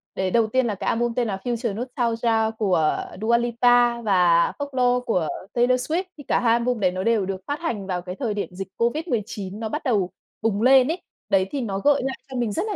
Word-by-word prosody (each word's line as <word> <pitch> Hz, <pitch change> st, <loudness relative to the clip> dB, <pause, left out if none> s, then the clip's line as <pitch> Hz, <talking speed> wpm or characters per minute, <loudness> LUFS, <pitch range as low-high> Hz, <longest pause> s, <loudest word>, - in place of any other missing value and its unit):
Đấy, 190 Hz, -1 st, -1 dB
đầu 230 Hz, +1 st, +3 dB
tiên 260 Hz, +3 st, +1 dB
là 210 Hz, -, -1 dB
cái -, -, -5 dB
album 235 Hz, 0 st, 0 dB
tên 240 Hz, 0 st, 0 dB
là 195 Hz, -3 st, -2 dB
Future 235 Hz, -3 st, -2 dB
Nostalgia 230 Hz, -1 st, 0 dB
của 180 Hz, -7 st, +1 dB, 0.2 s
Dua 235 Hz, +2 st, +3 dB
Lipa 240 Hz, 0 st, +3 dB
và 180 Hz, -5 st, +3 dB
Folklore 250 Hz, -3 st, +1 dB
của 180 Hz, -9 st, 0 dB, 0.3 s
Taylor 250 Hz, +1 st, +2 dB
Swift. 350 Hz, +3 st, +1 dB
Thì 290 Hz, -, -10 dB
cả -, -, +2 dB
2 230 Hz, -2 st, +3 dB
album 240 Hz, 0 st, 0 dB
đấy 185 Hz, -3 st, +2 dB
nó 185 Hz, +1 st, -3 dB
đều 225 Hz, -2 st, +2 dB
được 190 Hz, 0 st, -4 dB
phát 290 Hz, +2 st, -2 dB
hành 225 Hz, -, -3 dB
vào 180 Hz, -2 st, -2 dB
cái 180 Hz, +1 st, -7 dB
thời 225 Hz, -1 st, -2 dB
điểm 205 Hz, -, -3 dB
dịch 190 Hz, +1 st, -6 dB
COVID-19 230 Hz, -, -2 dB
nó 225 Hz, -1 st, -3 dB
bắt 300 Hz, +6 st, -4 dB
đầu 205 Hz, -9 st, +1 dB, 0.3 s
bùng 215 Hz, -2 st, 0 dB
lên 260 Hz, +1 st, +6 dB
ấy. 340 Hz, +4 st, -2 dB, 0.3 s
Đấy, 195 Hz, -2 st, +3 dB
thì 280 Hz, -, -2 dB
nó 195 Hz, -5 st, -3 dB
gợi 285 Hz, +4 st, +3 dB
lại 265 Hz, 0 st, -3 dB
cho 260 Hz, -, -5 dB
mình 240 Hz, -3 st, 0 dB
rất 205 Hz, -, -1 dB
là 420 Hz, -, -2 dB
230 Hz, 230 wpm, -23 LUFS, 200-250 Hz, 0.3 s, lên